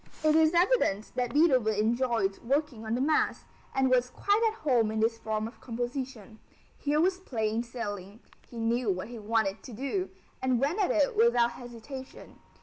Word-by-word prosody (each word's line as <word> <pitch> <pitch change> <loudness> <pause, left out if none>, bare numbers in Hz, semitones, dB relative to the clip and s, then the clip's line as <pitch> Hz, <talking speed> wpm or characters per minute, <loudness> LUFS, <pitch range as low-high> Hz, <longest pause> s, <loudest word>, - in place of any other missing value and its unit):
It 310 0 +4
is 320 +1 +4
evident 345 - +2
that 245 -1 -1
Beethoven 260 -8 +3
enjoyed 225 -2 +1
working 255 -3 -1
on 220 - 0
the 250 - -1
Mass, 305 +3 +1 0.3
and 265 0 +3
was 250 -1 +3
quite 405 - +1
at 445 0 -4
home 240 -7 +2
in 220 0 -2
this 225 +1 +1
form 220 -1 -2
of 230 - -14
composition. 240 -2 -5 0.4
Here 295 +1 +1
was 365 +3 +2
plain 225 - -1
sailing; 205 -4 -6 0.3
he 240 - -10
knew 230 0 0
what 185 +3 -2
he 240 -2 -8
wanted 215 -2 0
to 250 - -10
do, 275 - -2 0.3
and 255 -2 +1
went 295 - 0
at 390 - +2
it 290 -3 +2
without 235 +1 +4
hesitation. 245 +3 -10
240 Hz, 175 wpm, -29 LUFS, 220-280 Hz, 0.4 s, It